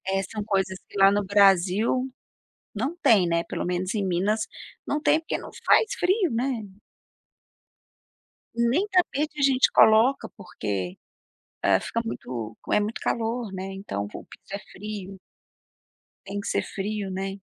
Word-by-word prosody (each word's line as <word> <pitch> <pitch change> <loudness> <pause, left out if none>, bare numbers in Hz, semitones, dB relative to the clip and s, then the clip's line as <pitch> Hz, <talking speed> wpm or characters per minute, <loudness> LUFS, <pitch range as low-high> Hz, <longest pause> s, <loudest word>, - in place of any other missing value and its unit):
É 195 - +2
são 210 +2 -5
coisas 190 -2 0
que - - -9
lá 195 0 +7
no 205 0 +1
Brasil 200 +5 +3 0.7
não 265 +11 -2
tem 200 -6 +5
né 170 0 +1
pelo - - -3
menos 180 +2 -2
em 205 -3 0
Minas 190 +5 +1 0.5
não 295 - -1
tem 310 - +4
porque 325 - -3
não - - -9 0.2
faz 435 - +4
frio 370 0 +2
né. 240 0 -1 1.9
Nem 240 - +2
tapete 310 -5 +1
a - - +1
gente 265 -1 +4
coloca 225 +5 +5
porque 105 - -4 0.7
é, 95 -1 +4
fica 230 - -2
muito 115 - -5 0.2
é - - +5
muito 210 +2 -3
calor 230 -2 -2
né 190 0 -5
então 190 - -4
o - - -8
piso - - -16
é 200 - -2
frio. 195 -1 -7 1.1
Tem 200 +1 -4
que 200 - -6
ser - - +1
frio 205 0 -4
né. 195 +1 -4
205 Hz, 150 wpm, -25 LUFS, 190-235 Hz, 1.9 s, lá